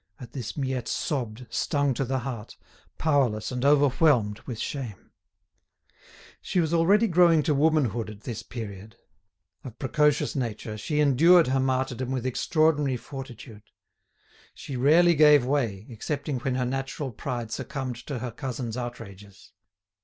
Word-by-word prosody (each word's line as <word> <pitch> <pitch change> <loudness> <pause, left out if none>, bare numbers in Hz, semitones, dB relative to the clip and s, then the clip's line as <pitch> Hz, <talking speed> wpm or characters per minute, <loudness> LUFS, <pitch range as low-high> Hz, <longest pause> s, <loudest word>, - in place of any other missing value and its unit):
At 125 - -11
this 125 -1 -6
Miette 130 -4 -2
sobbed, 125 -4 -3
stung 145 -3 0
to 130 - -2
the 130 +1 -1
heart, 120 -4 -7 0.4
powerless 130 -9 +1
and 125 0 -3
overwhelmed 140 -6 +3
with 120 -4 -5
shame. 120 -5 -6 1.3
She 185 - -1
was 165 -1 0
already 195 +7 +4
growing 170 -5 +4
to 155 - +1
womanhood 140 -7 +1
at 105 -1 -11
this 115 -2 -5
period. 105 -3 -8 0.7
Of 120 -3 -9
precocious 150 +2 +1
nature, 110 -4 -3
she 150 +8 -2
endured 160 +3 +5
her 135 +1 +2
martyrdom 130 -1 -1
with 130 -2 -2
extraordinary 145 0 +1
fortitude. 120 -5 -10 0.9
She 140 - -7
rarely 160 +7 +5
gave 150 -4 +6
way, 115 -8 -1
excepting 135 +3 -4
when 125 +1 -2
her 125 -1 0
natural 135 +2 -3
pride 120 -1 -5
succumbed 130 0 -4
to 140 - -3
her 120 0 -5
cousin's 125 -2 -5
outrages. 105 -5 -9
130 Hz, 140 wpm, -26 LUFS, 115-145 Hz, 1.3 s, gave